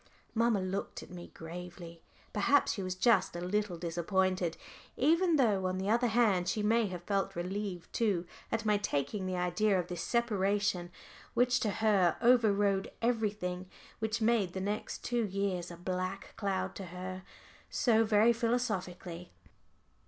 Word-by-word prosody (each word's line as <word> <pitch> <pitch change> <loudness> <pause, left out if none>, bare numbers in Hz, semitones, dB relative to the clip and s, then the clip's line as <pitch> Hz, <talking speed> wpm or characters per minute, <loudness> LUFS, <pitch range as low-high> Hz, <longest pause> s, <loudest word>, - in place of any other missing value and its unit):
Mamma 230 -2 +2
looked 185 +1 -4
at - - -14
me 175 -1 -8
gravely. 170 0 -9 0.3
Perhaps 275 +8 +3
she 200 - -4
was 185 -1 -3
just 190 -2 +3
a - - -3
little 185 0 -1
disappointed, 175 +1 0 0.4
even 335 +5 +3
though 210 -9 +3
on 185 0 -1
the 195 +2 -1
other 240 +2 +3
hand 215 -6 +3
she 210 +1 -1
may 225 +1 +3
have 180 -2 -6
felt 195 +1 -1
relieved 180 0 -4
too, 200 -7 +1 0.3
at 225 0 -1
my 210 -1 +3
taking 190 +2 -2
the 185 - -2
idea 180 +3 +2
of 175 0 -4
this 175 -2 -4
separation, 205 -5 0 0.4
which 245 +1 +3
to 215 - 0
her 200 -4 +2
over 235 -2 +5
rode 200 -1 +1
everything, 205 -6 -1 0.3
which 220 0 -1
made 220 -5 +2
the 190 - -3
next 205 +3 -3
two 240 -1 +1
years 195 -3 -2
a 170 - -9
black 185 +2 -4
cloud 190 -2 -2
to 195 - -7
her, 185 +1 -6 0.5
so 225 -2 +3
very 220 +2 +4
philosophically. 190 -7 -2
195 Hz, 155 wpm, -32 LUFS, 180-220 Hz, 0.5 s, over